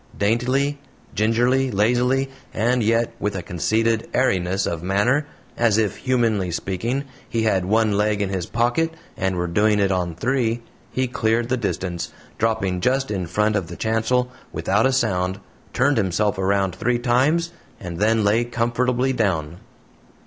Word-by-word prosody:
Daintily, 130 Hz, +7 st, +1 dB, 0.3 s
gingerly, 120 Hz, +5 st, +2 dB
lazily, 125 Hz, +5 st, +1 dB, 0.2 s
and 120 Hz, +3 st, +2 dB
yet 115 Hz, +1 st, +1 dB
with 105 Hz, -1 st, -2 dB
a 90 Hz, -, -4 dB
conceited 110 Hz, +7 st, 0 dB
airiness 95 Hz, -6 st, +1 dB
of 85 Hz, -2 st, -3 dB
manner, 105 Hz, -, +1 dB, 0.3 s
as 115 Hz, -3 st, +2 dB
if, 105 Hz, -4 st, 0 dB
humanly 115 Hz, -7 st, +1 dB
speaking, 100 Hz, +10 st, -2 dB, 0.3 s
he 115 Hz, -1 st, 0 dB
had 95 Hz, -4 st, +1 dB
one 110 Hz, +2 st, +2 dB
leg 105 Hz, 0 st, +1 dB
in 100 Hz, -2 st, -1 dB
his 95 Hz, -3 st, -3 dB
pocket 125 Hz, +8 st, 0 dB, 0.2 s
and 95 Hz, 0 st, -1 dB
were 90 Hz, 0 st, -1 dB
doing 105 Hz, +5 st, +2 dB
it 100 Hz, -1 st, +2 dB
on 90 Hz, -3 st, -1 dB
three, 120 Hz, +2 st, 0 dB, 0.3 s
he 130 Hz, -, 0 dB
cleared 120 Hz, -1 st, 0 dB
the 130 Hz, -, +2 dB
distance, 90 Hz, -5 st, -3 dB, 0.3 s
dropping 110 Hz, -5 st, 0 dB
just 130 Hz, +1 st, +1 dB
in 95 Hz, -4 st, -2 dB
front 105 Hz, +5 st, +1 dB
of 95 Hz, -4 st, -1 dB
the 85 Hz, -, -8 dB
chancel, 115 Hz, +3 st, 0 dB, 0.2 s
without 105 Hz, +6 st, +1 dB
a -, -, +1 dB
sound, 95 Hz, -7 st, 0 dB, 0.3 s
turned 140 Hz, +1 st, +2 dB
himself 100 Hz, 0 st, +1 dB
around 95 Hz, -1 st, +1 dB
three 120 Hz, +1 st, 0 dB
times, 135 Hz, +8 st, +2 dB, 0.3 s
and 90 Hz, -2 st, -6 dB
then 110 Hz, +1 st, +3 dB
lay 105 Hz, +4 st, +3 dB
comfortably 120 Hz, +2 st, 0 dB
down. 85 Hz, -9 st, -1 dB
110 Hz, 155 wpm, -22 LUFS, 95-125 Hz, 0.3 s, then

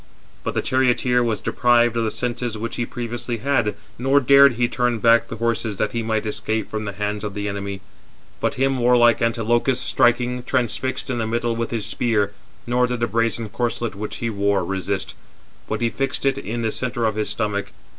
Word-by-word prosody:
But -, -, -3 dB
the -, -, 0 dB
charioteer 125 Hz, -1 st, +2 dB
was 110 Hz, -4 st, -1 dB
deprived 120 Hz, -1 st, +3 dB
of 115 Hz, -, +1 dB
the 110 Hz, -, +1 dB
senses 120 Hz, -1 st, -3 dB
which 115 Hz, +2 st, -5 dB
he 120 Hz, -, -1 dB
previously 120 Hz, 0 st, -4 dB
had, 120 Hz, -3 st, 0 dB, 0.2 s
nor 135 Hz, +3 st, +4 dB
dared 140 Hz, +1 st, +7 dB
he 120 Hz, +1 st, +1 dB
turn 125 Hz, -1 st, 0 dB
back 115 Hz, +1 st, +4 dB
the -, -, -6 dB
horses 115 Hz, -2 st, -1 dB
that -, -, 0 dB
he 115 Hz, -, -2 dB
might 110 Hz, -1 st, -1 dB
escape 110 Hz, +1 st, -2 dB
from 110 Hz, 0 st, -3 dB
the 100 Hz, -, -4 dB
hands 105 Hz, +1 st, -3 dB
of 105 Hz, -1 st, -4 dB
the 105 Hz, 0 st, -3 dB
enemy: 100 Hz, -1 st, -4 dB, 0.6 s
but -, -, 0 dB
him 135 Hz, 0 st, +1 dB
warlike 120 Hz, -1 st, +4 dB
Antilochus, 120 Hz, +2 st, +1 dB
striking, 125 Hz, 0 st, +2 dB
transfixed 130 Hz, +1 st, -1 dB
in 120 Hz, -, -2 dB
the 110 Hz, -, -1 dB
middle 115 Hz, +1 st, -1 dB
with 115 Hz, 0 st, -2 dB
his 115 Hz, -4 st, -2 dB
spear; 105 Hz, -4 st, 0 dB, 0.3 s
nor 125 Hz, +1 st, +2 dB
did 125 Hz, -1 st, -3 dB
the 115 Hz, -, +2 dB
brazen 115 Hz, -1 st, 0 dB
corslet 120 Hz, +1 st, -2 dB
which 105 Hz, +2 st, -5 dB
he 115 Hz, -, -2 dB
wore 100 Hz, -2 st, +1 dB
resist, 95 Hz, +1 st, -3 dB, 0.6 s
but 110 Hz, +1 st, -2 dB
he 115 Hz, -1 st, +1 dB
fixed 135 Hz, +2 st, -2 dB
it 135 Hz, 0 st, +2 dB
in 120 Hz, -1 st, -4 dB
the 110 Hz, -, 0 dB
centre 125 Hz, -1 st, -2 dB
of 110 Hz, -, +1 dB
his 110 Hz, 0 st, -2 dB
stomach. 100 Hz, -1 st, -2 dB
115 Hz, 200 wpm, -22 LUFS, 110-125 Hz, 0.6 s, dared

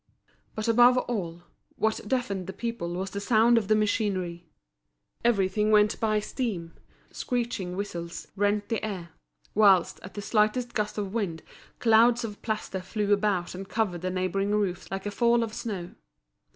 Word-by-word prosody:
But 215 Hz, 0 st, -3 dB
above 245 Hz, +2 st, +6 dB
all, 175 Hz, -9 st, -3 dB, 0.3 s
what 220 Hz, 0 st, 0 dB
deafened 200 Hz, -7 st, -1 dB
the 190 Hz, -, -5 dB
people 230 Hz, -4 st, -4 dB
was 190 Hz, +1 st, -3 dB
the 200 Hz, -, -4 dB
sound 230 Hz, +3 st, +4 dB
of 210 Hz, -, -6 dB
the 215 Hz, -, +4 dB
machinery. 190 Hz, -5 st, -1 dB, 0.7 s
Everything 210 Hz, -2 st, +2 dB
went 210 Hz, 0 st, +4 dB
by 215 Hz, -1 st, +2 dB
steam, 205 Hz, -7 st, -4 dB, 0.4 s
screeching 235 Hz, -7 st, -3 dB
whistles 175 Hz, -4 st, -5 dB
rent 205 Hz, +1 st, 0 dB
the 225 Hz, -2 st, -1 dB
air; 190 Hz, -6 st, -4 dB, 0.4 s
whilst, 195 Hz, -4 st, +4 dB
at 190 Hz, -, -11 dB
the 205 Hz, -, -4 dB
slightest 225 Hz, +3 st, +1 dB
gust 210 Hz, -2 st, -2 dB
of 200 Hz, -2 st, -3 dB
wind, 185 Hz, -8 st, -2 dB, 0.3 s
clouds 230 Hz, +1 st, +4 dB
of 210 Hz, -3 st, -6 dB
plaster 215 Hz, -4 st, -3 dB
flew 205 Hz, +2 st, 0 dB
about 200 Hz, -4 st, 0 dB
and 190 Hz, +1 st, -8 dB
covered 195 Hz, -7 st, -1 dB
the 185 Hz, -, -2 dB
neighbouring 185 Hz, +2 st, 0 dB
roofs 190 Hz, -4 st, -1 dB
like 195 Hz, +1 st, -4 dB
a 205 Hz, -, -2 dB
fall 235 Hz, +2 st, +3 dB
of 220 Hz, -1 st, -5 dB
snow. 190 Hz, -7 st, -5 dB
210 Hz, 160 wpm, -27 LUFS, 185-225 Hz, 0.7 s, above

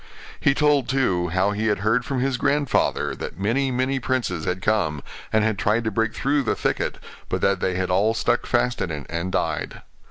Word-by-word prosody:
He 140 Hz, -, +3 dB
told, 145 Hz, -4 st, +2 dB
too, 100 Hz, -11 st, +1 dB
how 95 Hz, +4 st, +1 dB
he 105 Hz, +2 st, -1 dB
had 105 Hz, -2 st, 0 dB
heard 115 Hz, +4 st, +2 dB
from 135 Hz, -3 st, -1 dB
his 135 Hz, -1 st, 0 dB
grandfather 130 Hz, -, +1 dB
that -, -, -7 dB
many, 125 Hz, +7 st, +1 dB
many 130 Hz, +2 st, 0 dB
princes 120 Hz, -11 st, -1 dB
had 90 Hz, +1 st, -1 dB
come, 90 Hz, -8 st, 0 dB, 0.3 s
and 110 Hz, -1 st, +3 dB
had 110 Hz, -2 st, 0 dB
tried 110 Hz, +3 st, +1 dB
to 110 Hz, -, -1 dB
break 115 Hz, +2 st, 0 dB
through 140 Hz, +1 st, +1 dB
the 125 Hz, -, 0 dB
thicket, -, -, -1 dB, 0.3 s
but -, -, -1 dB
that 100 Hz, -1 st, +2 dB
they 95 Hz, -1 st, -1 dB
had 90 Hz, 0 st, -1 dB
all 105 Hz, +5 st, +2 dB
stuck 110 Hz, -, 0 dB
fast 120 Hz, 0 st, +1 dB
in 90 Hz, -, -1 dB
it, 75 Hz, -3 st, -5 dB
and 85 Hz, +2 st, -2 dB
died. 95 Hz, -, -2 dB
110 Hz, 210 wpm, -23 LUFS, 95-130 Hz, 0.3 s, He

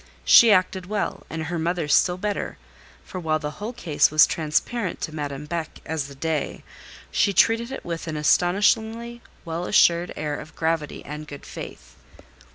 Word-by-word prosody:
She 230 Hz, -2 st, +8 dB
acted 185 Hz, -1 st, +2 dB
well, 210 Hz, +1 st, -3 dB
and 160 Hz, 0 st, -4 dB
her 170 Hz, +2 st, -3 dB
mother 170 Hz, -1 st, -1 dB
still 180 Hz, +4 st, +3 dB
better; 205 Hz, +2 st, -3 dB, 0.5 s
for 185 Hz, -, -6 dB
while 160 Hz, -2 st, 0 dB
the 150 Hz, -1 st, -5 dB
whole 215 Hz, +3 st, -3 dB
case 155 Hz, -11 st, +2 dB
was 155 Hz, +1 st, +7 dB
transparent 170 Hz, +6 st, -1 dB
to 155 Hz, -, -4 dB
Madame 145 Hz, -1 st, -5 dB
Beck 160 Hz, 0 st, -5 dB
as 155 Hz, -3 st, -3 dB
the 140 Hz, -, -12 dB
day, 155 Hz, +2 st, -3 dB, 0.5 s
she 200 Hz, -, +2 dB
treated 230 Hz, +6 st, +3 dB
it 270 Hz, -, -7 dB
with 170 Hz, -1 st, -5 dB
an 155 Hz, -1 st, -3 dB
astonishingly 220 Hz, +9 st, +1 dB, 0.2 s
well 165 Hz, +1 st, -3 dB
assured 170 Hz, +1 st, +4 dB
air 150 Hz, -1 st, -3 dB
of 155 Hz, -, -11 dB
gravity 160 Hz, -2 st, -2 dB
and 150 Hz, +1 st, -7 dB
good 145 Hz, -1 st, -10 dB
faith. -, -, -10 dB
165 Hz, 165 wpm, -24 LUFS, 155-200 Hz, 0.5 s, She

